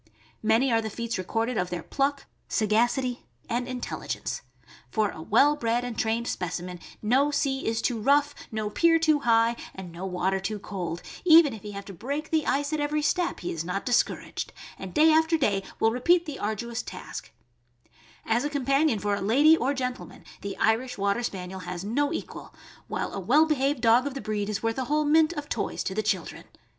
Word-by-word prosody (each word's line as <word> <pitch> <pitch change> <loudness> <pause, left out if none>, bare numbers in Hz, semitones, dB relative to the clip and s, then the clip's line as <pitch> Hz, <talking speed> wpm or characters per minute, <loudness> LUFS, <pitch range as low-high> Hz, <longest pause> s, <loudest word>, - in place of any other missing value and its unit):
Many 225 +4 +3
are 225 -1 +3
the 220 - -4
feats 230 -1 -4
recorded 225 +5 -1
of 180 0 -1
their 175 -2 -4
pluck, 280 0 -1 0.2
sagacity, 240 +4 +1 0.2
and 245 +1 -1
intelligence. 255 -1 -4 0.5
For 215 -2 +1
a 160 - -9
well 275 - +4
bred 235 -3 0
and 245 -2 -4
trained 230 +2 0
specimen 180 0 -4 0.2
no 265 +7 +3
sea 275 -2 -1
is 225 0 0
too 240 -3 0
rough, 290 +4 +3 0.2
no 215 -1 -3
pier 335 +7 +4
too 310 -2 +3
high, 230 -2 +3 0.2
and 190 -2 -8
no 175 +3 -6
water 190 +1 0
too 210 +3 -3
cold; 180 -4 -5 0.2
even 325 -5 +7
if 220 - -9
he 210 0 -8
have 200 0 -7
to 195 - -9
break 280 - -4
the 315 -2 +1
ice 285 +2 0
at 310 - 0
every 295 +1 0
step, 355 +3 0
he 175 - -3
is 165 -1 -3
not 180 +3 -3
discouraged'; 245 -1 0 0.3
and 190 -2 -8
day 315 +1 +6
after 320 +1 +4
day 205 -10 +1 0.2
will 225 - +3
repeat 340 +9 +3
the 295 -4 -6
ardu 220 +3 -3
ous 230 - -2
task, - - -8 0.9
As 230 +2 +1
a 290 - -1
companion 275 -2 +2
for 205 0 -1
a 200 - -1
lady 280 +11 +5
or 280 -2 0
gentleman 255 -1 -5 0.2
the 200 -1 -5
Irish 240 +3 +1
Water 200 +3 +1
Spaniel 190 -4 -5
has 180 0 -6
no 285 +7 0
equal, 335 - -6 0.3
while - - -3
a - - -3
well 270 - +4
behaved 280 -3 0
dog 240 +3 +4
of 280 - -5
the - - -3
breed 210 -1 -2
is 215 +1 -3
worth 225 +3 0
a 260 - -1
whole 300 +3 +1
mint 310 +2 +4
of 295 -3 -5
toys - - -2
to 190 - -3
the 215 - 0
children. 190 -5 -2
235 Hz, 200 wpm, -27 LUFS, 205-285 Hz, 0.9 s, even